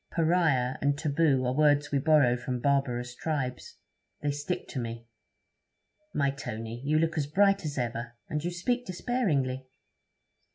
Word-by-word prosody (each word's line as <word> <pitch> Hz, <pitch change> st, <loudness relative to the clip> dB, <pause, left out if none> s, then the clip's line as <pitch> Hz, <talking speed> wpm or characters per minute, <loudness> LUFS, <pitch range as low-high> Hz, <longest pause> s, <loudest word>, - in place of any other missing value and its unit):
"Pariah" 160 Hz, -7 st, +2 dB
and 140 Hz, 0 st, +2 dB
"taboo" 145 Hz, -3 st, +2 dB
are 125 Hz, -, +1 dB
words 150 Hz, 0 st, +3 dB
we 140 Hz, -, +2 dB
borrow 140 Hz, -4 st, +4 dB
from 125 Hz, 0 st, -3 dB
barbarous 125 Hz, -3 st, 0 dB
tribes; 130 Hz, -3 st, -3 dB, 0.5 s
they 145 Hz, -, +1 dB
stick 145 Hz, +5 st, -3 dB
to 130 Hz, -, -4 dB
me.' 115 Hz, -1 st, -5 dB, 1.1 s
'My 140 Hz, -1 st, +1 dB
Tony, 115 Hz, -3 st, -6 dB
you 150 Hz, +2 st, +2 dB
look 160 Hz, 0 st, +1 dB
as 140 Hz, -, -1 dB
bright 195 Hz, +5 st, +3 dB
as 145 Hz, -1 st, -4 dB
ever, 120 Hz, -1 st, -3 dB
and 150 Hz, 0 st, -3 dB
you 175 Hz, -, 0 dB
speak 240 Hz, +8 st, -1 dB
despairingly.' 160 Hz, -, -1 dB
140 Hz, 150 wpm, -29 LUFS, 125-160 Hz, 1.1 s, borrow